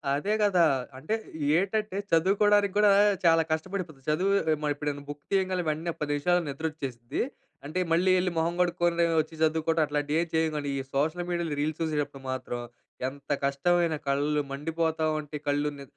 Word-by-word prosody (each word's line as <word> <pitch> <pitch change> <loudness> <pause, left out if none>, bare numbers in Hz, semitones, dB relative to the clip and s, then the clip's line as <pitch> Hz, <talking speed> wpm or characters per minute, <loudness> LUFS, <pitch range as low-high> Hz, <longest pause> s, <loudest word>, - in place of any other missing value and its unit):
అదే 195 +9 -1
కదా! 195 -4 +4 0.3
అంటే, 155 +11 -2 0.4
ఏంటంటే 200 +2 -1
చదువుకోవడానికి 200 +4 +3
కూడా 210 -1 +6 0.3
చాలా 165 -1 +5
కష్టపడిపోతం. 160 -2 -3
చదువు 185 +6 +2 0.2
హ్మ్. 155 -1 0
ఎప్పుడైనా 145 -1 -4
బుక్ 145 -1 -7
తీయగానే 190 -2 +1
వెంటనే 160 +3 -2
10 150 -1 -1
నిమిషాల్లో 175 +4 +2
నిద్రొచ్చేస్తది. 135 -5 -4 0.4
అంటే 155 +5 -3
మళ్ళీ 175 +3 +3
వెళ్ళి 180 0 +1
మొహం 165 +1 +1
కడుక్కొని 175 -1 +2 0.2
వచ్చి 160 +1 -10
చదువుకోవడం 160 +1 +2
అట్లాంటివి 150 +1 -1
ఏం 170 - -2
చేయం 160 0 +2
కాని, 145 -1 -3
ఈ - - -1
సోషల్ 155 +5 0
మీడియాలో 170 -3 -1
రీల్స్ 155 +2 -2
చూసేటప్పుడు 145 -3 -2
మాత్రం 130 -2 -4 0.5
ఎంత 140 +2 -8
కష్టమైన 165 +4 +2
కళ్ళు 145 +2 +1
మండిపోతా 160 +2 -1
ఉంటే, 150 0 -8
కళ్ళు 145 +1 +1
ని 140 - -9
160 Hz, 155 wpm, -28 LUFS, 145-175 Hz, 0.5 s, కూడా